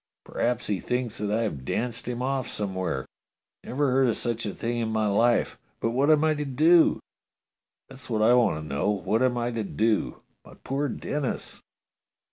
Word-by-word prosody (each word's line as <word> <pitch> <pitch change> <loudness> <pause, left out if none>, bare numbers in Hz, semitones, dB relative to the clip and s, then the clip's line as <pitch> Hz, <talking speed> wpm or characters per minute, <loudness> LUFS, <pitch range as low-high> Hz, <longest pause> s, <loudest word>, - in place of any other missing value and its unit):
P'raps 125 0 -1
he 100 -3 -1
thinks 125 0 -2
that 105 0 -2
I 110 +2 +1
have 75 - -3
danced 115 - -3
him 125 0 -3
off 130 -1 -1
somewhere. 95 -9 -3 0.6
Never 140 +1 0
heard 130 0 +3
of 115 - 0
such 115 -2 -2
a 100 - -5
thing 120 +1 -2
in 115 -1 -1
my 110 -1 0
life. 115 +4 +2 0.2
But 115 - 0
what 135 +5 +2
am 155 -1 +5
I 155 0 +3
to 150 -1 -3
do? 155 +5 +4 0.9
That's 130 -1 -12
what 110 -2 +1
I 115 +2 +6
want 120 -7 +4
to 75 0 -7
know! 70 +6 -1
What 105 +2 0
am 125 -1 +2
I 120 0 -1
to 115 -2 -2
do? 110 +2 -1 0.2
My - - -15
poor 140 +2 -2
Denis! 145 -3 -4
120 Hz, 190 wpm, -26 LUFS, 110-130 Hz, 0.9 s, I